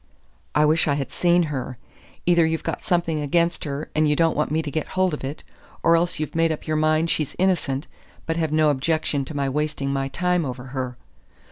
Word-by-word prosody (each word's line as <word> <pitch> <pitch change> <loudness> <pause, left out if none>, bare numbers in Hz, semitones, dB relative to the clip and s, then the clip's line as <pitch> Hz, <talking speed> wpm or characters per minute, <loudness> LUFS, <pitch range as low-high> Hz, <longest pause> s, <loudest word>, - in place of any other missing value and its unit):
I 150 - +5
wish 155 +2 +3
I 145 - +2
had 140 -2 -3
seen 175 0 +3
her. 130 -5 -4 0.5
Either 170 -1 +5
you've 160 0 0
got - - -3
something 170 -5 +1
against 170 +4 +1
her 145 +1 -4
and 155 -1 +3
you 150 - +3
don't 165 +1 +2
want 150 - 0
me 160 +1 0
to 145 - -4
get 155 0 -2
hold 185 -2 +3
of 150 - -5
it; 140 +3 -5 0.4
or 165 0 +5
else 170 +1 +1
you've 155 - -3
made 165 0 +2
up 155 - -4
your 155 - -1
mind 155 +1 +2
she's 155 -3 -1
innocent, 165 -6 +1 0.4
but 165 - -1
have 160 -2 -1
no 155 -1 +4
objection 145 0 0
to 155 - -8
my 140 -1 0
wasting 140 -1 -1
my 135 0 -1
time 180 +3 0
over 125 -3 -5
her. 130 -2 -3
155 Hz, 220 wpm, -23 LUFS, 140-165 Hz, 0.5 s, I